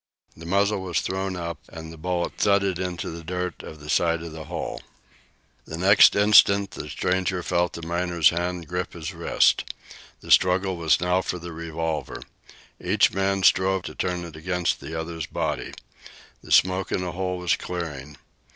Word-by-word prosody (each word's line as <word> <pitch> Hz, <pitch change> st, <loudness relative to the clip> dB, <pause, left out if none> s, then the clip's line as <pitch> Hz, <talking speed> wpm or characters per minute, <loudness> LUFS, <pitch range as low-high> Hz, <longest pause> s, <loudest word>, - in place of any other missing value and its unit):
The 85 Hz, +1 st, -11 dB
muzzle 100 Hz, +2 st, +1 dB
was 90 Hz, -3 st, -1 dB
thrown 95 Hz, 0 st, -3 dB
up 85 Hz, -3 st, -5 dB
and 80 Hz, 0 st, -9 dB
the -, -, -10 dB
bullet 90 Hz, +2 st, -2 dB
thudded 100 Hz, -3 st, +2 dB
into 90 Hz, -4 st, -4 dB
the 85 Hz, 0 st, -8 dB
dirt 90 Hz, +1 st, -4 dB
of 80 Hz, -, -10 dB
the 75 Hz, -, -12 dB
side 85 Hz, +1 st, +1 dB
of 85 Hz, -, -7 dB
the 80 Hz, 0 st, -8 dB
hole. 85 Hz, +1 st, -5 dB, 0.8 s
The 80 Hz, -, -7 dB
next 95 Hz, +3 st, +6 dB
instant 100 Hz, -1 st, +5 dB
the -, -, -7 dB
stranger 90 Hz, 0 st, -1 dB
felt 85 Hz, +1 st, 0 dB
the 85 Hz, -, -8 dB
miner's 85 Hz, -1 st, +2 dB
hand 85 Hz, -1 st, -3 dB
grip 90 Hz, +1 st, -3 dB
his 85 Hz, +2 st, -6 dB
wrist. 85 Hz, 0 st, +2 dB, 0.6 s
The -, -, -7 dB
struggle 95 Hz, +1 st, +4 dB
was 85 Hz, -2 st, +2 dB
now 90 Hz, +1 st, +2 dB
for 90 Hz, -, -3 dB
the 85 Hz, 0 st, -8 dB
revolver. 80 Hz, -1 st, -4 dB, 0.6 s
Each 100 Hz, +3 st, +3 dB
man 95 Hz, 0 st, 0 dB
strove 95 Hz, 0 st, +3 dB
to -, -, -7 dB
turn 90 Hz, -1 st, -2 dB
it 80 Hz, -2 st, -10 dB
against 90 Hz, +2 st, -1 dB
the 80 Hz, +1 st, -6 dB
other's 80 Hz, -1 st, -5 dB
body. -, -, -3 dB, 0.7 s
The -, -, -13 dB
smoke 95 Hz, +1 st, +3 dB
in -, -, 0 dB
the 90 Hz, -1 st, -3 dB
hole 90 Hz, +1 st, -3 dB
was 90 Hz, -4 st, +1 dB
clearing. 75 Hz, -5 st, -6 dB
90 Hz, 175 wpm, -24 LUFS, 85-95 Hz, 0.8 s, next